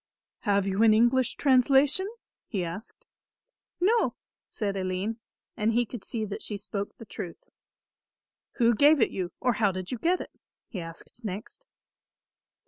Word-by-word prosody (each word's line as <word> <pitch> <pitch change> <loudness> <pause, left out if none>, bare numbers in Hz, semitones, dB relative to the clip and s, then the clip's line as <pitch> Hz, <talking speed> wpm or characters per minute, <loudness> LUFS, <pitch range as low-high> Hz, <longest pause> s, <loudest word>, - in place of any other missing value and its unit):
"Have 200 -1 +2
you 195 +1 0
an 220 -1 +7
English 240 +2 +3
translation?" 275 +6 +4 0.4
he 190 -6 -2
asked. 200 - -8 0.7
"No," 440 +6 +3 0.3
said 200 -3 -2
Aline, 190 +4 -2 0.4
and 215 +2 +1
he 240 +1 +3
could 230 -2 -8
see 220 -2 -3
that 205 -1 -6
she 210 - -4
spoke 200 0 -5
the 230 - -10
truth. 190 -4 -7 1.1
"Who 235 -2 +4
gave 290 +6 +6
it 225 - +3
you, 185 -2 -3
or 250 -1 +2
how 205 -2 +2
did 185 -1 -5
you 250 - -3
get 355 +6 +2
it?" - - -7 0.3
he 190 - -6
asked 165 +8 -11
next. 215 - -6
220 Hz, 150 wpm, -28 LUFS, 195-255 Hz, 1.1 s, an